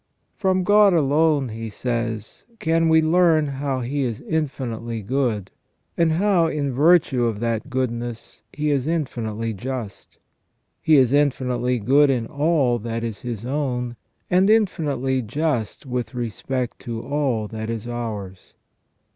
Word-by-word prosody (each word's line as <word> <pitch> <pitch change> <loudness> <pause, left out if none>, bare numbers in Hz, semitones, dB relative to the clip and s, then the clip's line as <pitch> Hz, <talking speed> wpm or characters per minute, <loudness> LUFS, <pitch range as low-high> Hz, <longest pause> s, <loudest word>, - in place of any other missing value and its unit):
From 185 -2 +1
God 205 0 +5
alone, 150 -2 +2
he 115 0 -6
says, 115 -1 -4
can 165 -2 +2
we 160 0 +5
learn 160 -1 +4
how 135 -1 -2
He 140 +4 -2
is 120 -4 -2
infinitely 120 -7 -3
good, 115 -4 -1 0.4
and 165 -2 +2
how 180 -1 +3
in 145 -4 -2
virtue 145 -3 +4
of 110 -3 -1
that 115 -2 -2
goodness 120 -2 -4
He 150 0 -1
is 140 -1 0
infinitely 115 -8 -2
just. 120 0 -6 0.6
He 160 - +4
is 130 -1 +4
infinitely 125 -3 +1
good 140 +6 +4
in 125 -4 +1
all 145 -4 +1
that 115 +1 -4
is 115 -3 -4
His 120 -2 -5
own, 125 -3 -2 0.3
and 185 +3 +3
infinitely 145 - +1
just 125 -1 -2
with 125 -1 -4
respect 120 +2 -3
to 115 -1 -5
all 130 -6 -1
that 110 0 -5
is 115 0 -4
ours. 105 -6 -6
130 Hz, 140 wpm, -22 LUFS, 115-150 Hz, 0.6 s, God